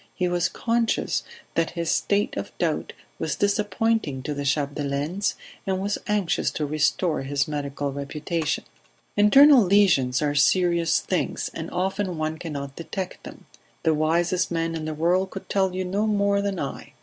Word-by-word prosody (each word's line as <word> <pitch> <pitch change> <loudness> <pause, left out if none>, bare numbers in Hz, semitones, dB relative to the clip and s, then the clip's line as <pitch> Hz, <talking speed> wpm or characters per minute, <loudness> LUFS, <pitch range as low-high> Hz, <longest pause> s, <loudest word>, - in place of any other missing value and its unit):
He 180 - 0
was 175 -1 +1
conscious 230 -1 0 0.3
that 165 -1 +1
his 170 -1 0
state 200 +5 +1
of - - -6
doubt - - -1 0.3
was - - -1
disappointing 205 - 0
to 150 - -3
the 145 0 -4
Chapdelaines, 145 +5 -1 0.3
and 190 -1 0
was 200 +2 -1
anxious 205 -4 +1
to 150 - -2
restore 155 +3 +1
his 140 +1 -1
medical 145 -1 -3
reputation. 150 +3 -2 0.5
"Internal 270 +6 +7
lesions 180 -10 +4
are 150 -1 0
serious 170 +2 +3
things, 185 - -2
and 165 0 -5
often 185 0 -2
one 155 0 -2
cannot 140 -4 -6
detect 185 +2 -5
them. - - -11 0.4
The 160 - +3
wisest 170 +4 +1
man 165 -1 -1
in 160 -1 -4
the 155 0 -3
world 180 +4 +2
could 195 - -8
tell 190 -2 +1
you 185 0 -2
no 200 +4 0
more 200 -1 +2
than 200 -3 -2
I. 140 - -6
170 Hz, 160 wpm, -25 LUFS, 150-195 Hz, 0.5 s, Internal